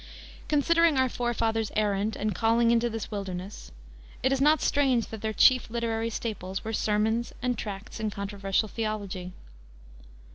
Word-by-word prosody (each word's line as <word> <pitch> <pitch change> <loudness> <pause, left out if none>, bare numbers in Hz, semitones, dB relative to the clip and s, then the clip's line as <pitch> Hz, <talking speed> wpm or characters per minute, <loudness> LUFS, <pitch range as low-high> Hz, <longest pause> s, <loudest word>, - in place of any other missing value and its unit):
Considering 330 +1 +3
our 260 0 +4
forefathers' 225 -3 -1
errand 210 0 0
and 210 0 -1
calling 230 +4 +3
into 235 0 +2
this 225 -1 -5
wilderness, 195 -1 -6 0.5
it 260 - +3
is 270 - 0
not 300 +2 +5
strange 265 -5 +2
that 220 -2 -7
their 220 - -1
chief 255 +3 +4
literary 230 -1 -1
staples 205 -4 -4
were 225 - -4
sermons 220 +3 0
and 250 -1 +1
tracts 205 0 -6
in 215 -1 -1
controversial 200 +1 -1
theology. 205 -5 -4
225 Hz, 145 wpm, -27 LUFS, 205-240 Hz, 0.5 s, not